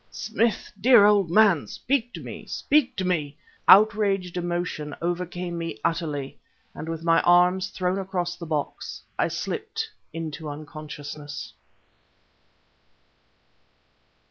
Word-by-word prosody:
"Smith, 225 -4 -1
dear 235 -2 +7
old 205 -4 +4
man! 195 -4 +4
speak 250 -2 -1
to - - -8
me! - - -8
speak 270 -4 +1
to 190 - -2
me!..." 155 -5 -1 0.3
Outraged 200 -3 +5
emotion 175 -4 -3
overcame 175 0 -3
me 165 -9 -4
utterly, 150 -5 -2 0.3
and 160 - -7
with 165 0 -4
my 165 0 +4
arms 180 +1 +4
thrown 185 +1 -1
across 180 -2 -2
the 170 -1 -8
box, 150 -2 -4 0.2
I - - +3
slipped - - -4 0.2
into 160 -1 -5
unconsciousness. 145 -2 -8
175 Hz, 115 wpm, -25 LUFS, 155-195 Hz, 0.3 s, dear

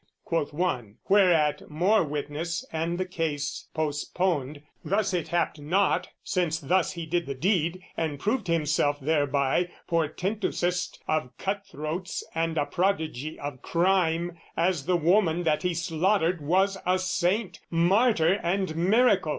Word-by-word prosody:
quoth 165 -4 -1
one: 125 - -2
Whereat, 175 -7 +3
more 180 +8 +3
witness 150 - -3
and 165 +2 -1
the 185 - -1
case 155 -5 -3
postponed, 150 -1 -1 0.2
"Thus 200 0 0
it 175 -3 -1
happed 170 -2 0
not, 180 +7 +1 0.2
since 170 -3 0
thus 180 +6 +1
he 170 -2 -5
did 175 +1 -1
the 140 - -3
deed, 175 +2 0
"And 155 -4 -2
proved 220 - -1
himself 150 -3 +1
thereby 145 +2 +1 0.2
portentousest 180 +2 -1
"Of 155 -5 -1
cutthroats 185 -3 -4
and 165 0 -1
a 145 - +2
prodigy 160 -4 -1
of 145 -3 -6
crime, 170 -1 +1 0.2
"As 170 -4 +1
the 180 -1 +3
woman 175 0 +3
that 155 -2 +1
he 180 -2 -1
slaughtered 170 +1 +1
was 190 +6 +2
a 185 +1 +2
saint, 185 +3 0
"Martyr 185 +1 +3
and 185 -1 -1
miracle!" 195 0 +3
170 Hz, 135 wpm, -27 LUFS, 155-185 Hz, 0.2 s, Whereat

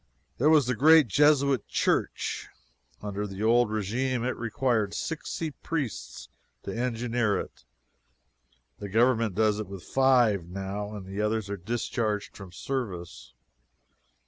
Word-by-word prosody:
There 145 +5 +4
was 155 -4 +5
the 125 - 0
great 155 +3 +6
Jesuit 140 +1 +3
Church. - - -1 0.6
Under 105 0 -3
the 95 +1 -6
old 120 0 +4
regime 115 +4 -1
it 130 - -1
required 115 -3 -1
sixty 160 0 -4
priests 145 -4 -5 0.4
to - - -5
engineer 120 -2 0
it - - -9 1.1
the 100 - -6
Government 115 -1 +2
does 105 0 +2
it 105 - -4
with 95 -2 -9
five, 120 -9 +3
now, 100 +3 -5
and 100 -3 -7
the 95 +2 -4
others 105 -1 -1
are - - -1
discharged 110 +1 -2
from 95 -3 -10
service. 85 - -5
110 Hz, 130 wpm, -27 LUFS, 100-130 Hz, 1.1 s, great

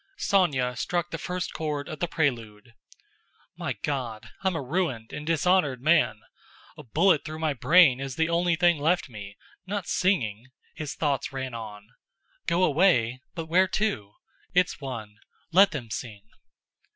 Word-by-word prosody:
Sónya 140 -11 +1
struck 175 +9 -2
the - - -4
first 180 0 -4
chord 150 -2 -3
of 155 -3 -7
the 175 - 0
prelude. 120 -8 -2 0.8
"My - - -3
God, 125 -7 -3
I'm 190 -2 +1
a 160 - -2
ruined 130 -6 -2
and 150 0 -6
dishonored 165 -4 +2
man! 125 -7 +2 0.5
A - - -10
bullet 155 - +2
through 155 -1 -6
my 160 -2 0
brain 150 -1 +5
is 135 -2 -5
the 160 +1 +1
only 170 0 +2
thing 175 -2 +3
left 165 +1 +1
me—not 115 - -8
singing!" 125 - 0 0.3
his 150 -2 -6
thoughts 145 -4 -1
ran 130 -2 -5
on. 105 -2 -8 0.6
"Go 175 +2 +2
away? 135 -8 +3
But 165 -2 -4
where 180 +4 +3
to? 180 - -2 0.4
It's 180 -3 +2
one—let 130 - 0
them 120 -8 -6
sing!" 110 -4 -6
150 Hz, 145 wpm, -26 LUFS, 120-175 Hz, 0.8 s, brain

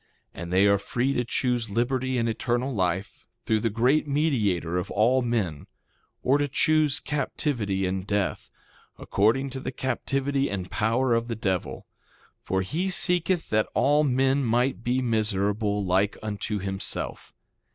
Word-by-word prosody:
And 85 +1 -7
they 95 +2 +4
are 100 -1 +4
free 125 +6 -1
to 125 - 0
choose 120 -2 -1
liberty 130 +4 0
and 115 -1 +1
eternal 120 +3 -1
life, 95 -1 -2 0.2
through 110 - +2
the 115 - 0
great 125 +8 +2
Mediator 110 - 0
of 90 +1 -3
all 120 +5 +3
men, 110 -11 -2 0.6
or 135 +3 +3
to 145 - +1
choose 150 0 +2
captivity 115 -9 -2
and 95 +1 -3
death, 100 -2 -1 0.5
according 120 +7 +1
to 135 - -5
the 130 - -4
captivity 135 +2 -1
and 95 -2 -5
power 120 +4 +1
of 115 0 0
the 115 - -3
devil; 95 -4 -2 0.6
for 95 0 -1
he 170 - -2
seeketh 180 -1 +2
that 110 0 +2
all 145 +2 +3
men 135 0 +2
might 120 +1 +1
be 125 +2 0
miserable 105 -2 0
like 95 +3 +1
unto 105 0 -3
himself. 95 0 -4
115 Hz, 150 wpm, -26 LUFS, 100-135 Hz, 0.6 s, they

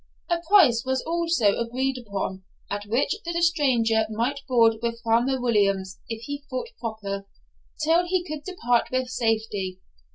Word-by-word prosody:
A 340 - +2
price 250 - +6
was 260 0 -1
also 330 -11 +1
agreed 255 +3 -1
upon, 195 -4 -4 0.3
at 205 0 -3
which 240 +7 +1
the 340 0 -2
stranger 250 -10 +2
might 235 +6 -1
board 230 -3 +4
with 230 0 -2
Farmer 240 +4 +2
Williams 200 -6 +1
if 225 0 -5
he 285 +2 -5
thought 255 - -4
proper, 200 -4 -5 0.6
till 335 +3 +3
he 360 -1 0
could 305 -1 -5
depart 245 -10 +1
with 255 -1 -1
safety. 220 -6 -1
235 Hz, 150 wpm, -25 LUFS, 220-285 Hz, 0.6 s, price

